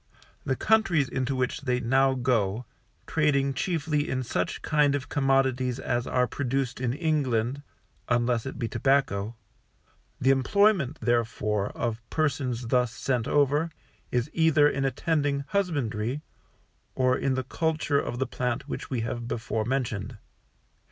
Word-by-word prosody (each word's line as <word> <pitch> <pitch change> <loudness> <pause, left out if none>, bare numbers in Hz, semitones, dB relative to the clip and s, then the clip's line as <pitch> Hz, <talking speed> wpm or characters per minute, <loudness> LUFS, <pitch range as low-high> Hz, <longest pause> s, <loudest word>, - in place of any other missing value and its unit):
The 130 - +1
countries 195 -10 +3
into 130 +1 -2
which 130 -1 -1
they 125 -3 0
now 130 +2 +3
go, 120 -3 0 0.4
trading 140 -3 +2
chiefly 155 -1 -1
in 130 0 -1
such 125 - -2
kind 150 -2 +3
of 135 -1 -4
commodities 135 -3 +1
as 120 -1 -1
are 125 0 +2
produced 130 -1 -2
in 125 -2 +1
England 140 -5 0 0.5
(unless 120 0 +1
it 135 - -6
be 115 - -2
tobacco), 115 -5 +1 0.8
the 135 - +4
employment, 160 - +3
therefore, 110 -4 0
of 115 -1 -2
persons 130 -6 -1
thus 125 -2 +2
sent 125 0 -1
over, 145 +3 +2 0.4
is 120 +1 +1
either 160 -3 +4
in 135 -1 0
attending 140 +1 0
husbandry, 145 - -1 0.7
or 130 -1 +3
in 135 0 0
the 130 - -1
culture 155 +1 0
of 120 - -3
the 130 - 0
plant 125 -1 -3
which - - -5
we 125 -4 -1
have 120 +1 -4
before 110 -2 -2
mentioned. 120 -4 -2
130 Hz, 140 wpm, -27 LUFS, 120-145 Hz, 0.8 s, the